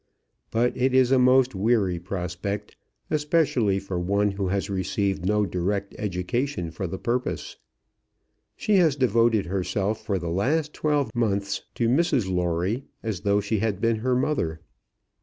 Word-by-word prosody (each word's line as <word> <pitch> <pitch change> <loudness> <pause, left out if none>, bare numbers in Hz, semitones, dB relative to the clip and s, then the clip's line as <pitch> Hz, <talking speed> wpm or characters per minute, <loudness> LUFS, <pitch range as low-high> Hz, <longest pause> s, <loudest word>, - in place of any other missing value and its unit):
But 120 +2 +1
it 130 +1 +1
is 130 -1 +4
a 135 - +5
most 130 0 +4
weary 100 -3 +1
prospect, 95 +3 -4 0.4
especially 150 - +2
for 95 -2 -3
one 100 +3 +1
who 95 -1 -2
has 100 +1 -1
received 95 -2 -1
no 105 0 +2
direct 100 +2 -2
education 100 - -2
for 90 +4 -4
the 95 - -5
purpose. 125 +5 -2 1.0
She 210 -2 +2
has 165 -6 +4
devoted 115 -4 +3
herself 100 +3 -2
for 100 - -1
the 85 -2 -4
last 150 - 0
twelve 145 -7 0
months 100 -4 0
to 115 - +1
Mrs 135 - +2
Lawrie, 90 +7 -1 0.2
as 110 -5 -2
though 100 0 +2
she 105 +1 -1
had 105 -2 -1
been 115 +1 +1
her 125 +3 0
mother. 85 - -1
105 Hz, 150 wpm, -25 LUFS, 95-125 Hz, 1.0 s, a